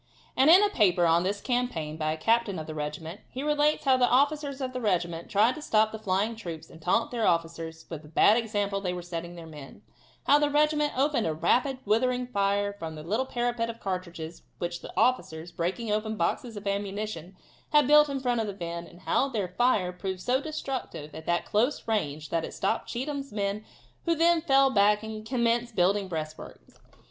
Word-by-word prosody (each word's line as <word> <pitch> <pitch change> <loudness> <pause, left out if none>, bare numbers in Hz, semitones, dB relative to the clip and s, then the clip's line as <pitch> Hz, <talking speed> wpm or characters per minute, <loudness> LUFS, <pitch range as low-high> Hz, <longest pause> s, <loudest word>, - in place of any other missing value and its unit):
And 270 +4 +5
in 365 +5 +8
a 415 - +3
paper 185 - +3
on 165 +1 +4
this 200 +3 -2
campaign 245 - -2
by 155 -1 -1
a 160 - -3
captain 225 +2 +1
of 155 - -5
the 155 - -6
regiment, 155 +4 -5
he 260 - -5
relates 300 0 +2
how 265 -1 +5
the 250 -1 +4
officers 285 +1 +1
of 260 -1 -3
the 255 - -4
regiment 175 -5 -1
tried 215 +5 +3
to 310 - -9
stop 220 -6 +2
the 220 - -6
flying 205 +3 0
troops, 170 -8 -8
and 165 - -14
taunted 180 +7 +1
their 235 -3 0
officers 165 -1 -2
with 160 -3 -7
the 150 - -15
bad 185 +7 +5
example 205 -4 -1
they 180 -2 -2
were 180 -1 -5
setting 170 0 -6
their 170 -1 -9
men; 145 -9 -12 0.4
how 290 +1 +6
the 295 0 +2
regiment 300 -1 +2
opened 270 - +2
a 155 - -1
rapid, 250 - +1
withering 250 +4 +1
fire 200 -3 0
from 165 -5 -7
a 155 - -8
little 220 +10 -1
parapet 240 -2 -1
of 230 0 -7
cartridges 175 -3 -5 0.2
which 175 0 -4
the - - -9
officers, 175 -9 +1
breaking 185 +7 -2
open 215 +1 -1
boxes 215 +5 -2
of 205 - -8
ammunition, 200 -3 -4 0.3
had 295 -2 +5
built 300 +2 +6
in 275 -1 -2
front 245 -3 0
of 220 - -3
the 200 - -5
men, 170 -2 -5
and 175 - -16
how 275 - +1
their 205 -8 -2
fire 195 -3 +2
proved 185 0 -5
so 255 +6 +1
destructive 270 - -5
at 160 0 -9
that 175 0 +1
close 235 +7 0
range 155 -9 -2
that 165 -1 0
it - - -6
stopped 210 +4 -1
Cheatham's 275 +2 -4
men 205 0 -2 0.4
who 335 -1 +2
then 335 +1 +3
fell 275 -4 +4
back 210 -1 +3
and 220 -1 -6
commenced 235 -1 0
building 195 +2 +2
breastworks. 155 -3 -7
210 Hz, 205 wpm, -28 LUFS, 170-250 Hz, 0.4 s, in